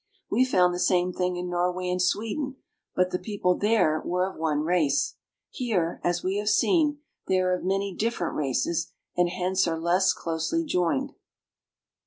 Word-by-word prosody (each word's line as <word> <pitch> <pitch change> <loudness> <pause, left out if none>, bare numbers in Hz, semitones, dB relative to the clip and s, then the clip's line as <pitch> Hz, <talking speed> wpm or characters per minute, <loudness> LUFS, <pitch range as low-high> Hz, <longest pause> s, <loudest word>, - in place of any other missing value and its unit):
We 255 - +4
found 180 -7 +3
the 175 - -3
same 180 0 +2
thing 180 0 -1
in 180 0 -4
Norway 180 +1 -1
and 180 0 0
Swe 205 +4 0
den, 275 -3 -4 0.4
but 180 0 +2
the 180 - -1
people 180 -2 0
there 180 -8 +2
were 180 +1 0
of 195 - -8
one 155 -2 0
race. 155 -4 +1 0.4
Here, 195 -10 -1
as 175 0 0
we 190 +2 0
have 210 0 0
seen, 295 - +2 0.3
they 190 - +2
are 185 0 +2
of 180 - -2
many 195 +1 -1
different 215 -4 -2
races 150 +4 -1 0.2
and 175 0 +2
hence 185 +1 0
are 165 -1 -1
less 175 +3 +3
closely 165 - -2
joined. 265 - 0
180 Hz, 175 wpm, -26 LUFS, 175-205 Hz, 0.4 s, We